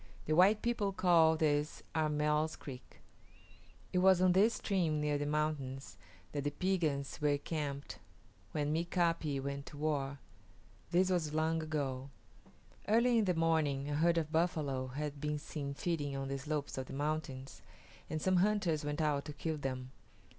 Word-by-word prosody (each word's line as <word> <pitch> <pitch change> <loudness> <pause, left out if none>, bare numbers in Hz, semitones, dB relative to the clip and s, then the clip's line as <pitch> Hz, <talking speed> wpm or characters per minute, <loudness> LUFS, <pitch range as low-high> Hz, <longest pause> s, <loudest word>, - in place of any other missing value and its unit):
The 155 - 0
white 195 +5 +5
people 235 -4 0
call 165 -4 +5
this 150 -1 0
Armell's 150 0 +1
Creek. 130 -3 -11 0.9
It 180 - +3
was 190 -1 +6
on 185 0 +5
this 205 +6 +4
stream 170 -7 0
near 150 -1 0
the 145 - -1
mountains 145 -3 -2 0.4
that 145 -2 -3
the 145 - +1
Piegans 155 -5 -1
were 145 -1 +3
camped 145 -2 -4 0.5
when 150 -1 -1
M[=i]ka´pi 165 -4 0
went 140 +1 -4
to 145 - -9
war. 145 -2 -1 0.7
This 185 +2 +3
was 155 -4 0
long 160 +1 +1
ago. 140 -4 -3 0.8
Early 235 +2 +4
in 215 - +2
the 180 -2 +1
morning 150 -4 +1
a - - -1
herd 170 +3 +3
of 155 -2 -1
buffalo 155 -6 0
had 145 +2 -5
been 150 0 -1
seen 145 -1 -5
feeding 145 -4 -2
on 135 0 -3
the 135 0 -2
slopes 150 -1 -3
of 130 - -5
the - - -8
mountains, 145 -2 -3 0.5
and 155 - -2
some 185 +3 +2
hunters 185 -5 +2
went 145 +2 -2
out 145 -2 +1
to 150 - -6
kill 155 +2 -3
them. 130 -2 -4
150 Hz, 160 wpm, -34 LUFS, 145-170 Hz, 0.9 s, was